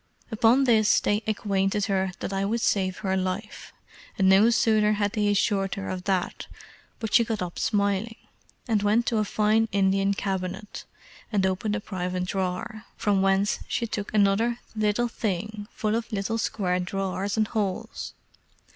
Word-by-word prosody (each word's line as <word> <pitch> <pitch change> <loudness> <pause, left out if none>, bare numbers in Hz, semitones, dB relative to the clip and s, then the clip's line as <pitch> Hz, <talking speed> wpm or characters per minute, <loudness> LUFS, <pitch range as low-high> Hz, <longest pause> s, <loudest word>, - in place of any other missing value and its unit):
Upon 230 +5 +4
this 220 -4 +4
they 205 +1 0
acquainted 200 -1 0
her 190 -2 0
that 195 - -3
I 195 0 0
would 225 +4 -1
save 190 -4 +1
her 190 0 +1
life; 190 +3 -4 0.5
and 190 -3 +3
no 195 +4 +6
sooner 215 -2 +3
had 205 -1 0
they 210 -2 +1
assured 200 -1 +1
her 195 0 -5
of 185 -1 -5
that 190 -3 -1 0.5
but 220 -4 -5
she 235 - +6
got 220 -4 -2
up 175 -1 -6
smiling, 205 +1 0 0.5
and 220 -4 +2
went 215 +3 +2
to 225 -1 +1
a - - +2
fine 215 +2 +2
Indian 195 0 +2
cabinet, 190 +1 -4 0.5
and 200 -3 +2
opened 190 +3 -1
a - - -1
private 180 -2 -3
drawer, 190 +3 -3
from 200 -2 +1
whence 195 +1 +2
she 235 - -1
took 210 -2 -4
another 215 +3 +2 0.2
little 215 +2 +1
thing 210 -1 -4
full 215 -1 -2
of 230 +1 -2
little 215 +2 -1
square 180 -5 -1
drawers 195 +2 -2
and 215 -1 +1
holes. 200 -4 -3
205 Hz, 165 wpm, -26 LUFS, 190-215 Hz, 0.5 s, no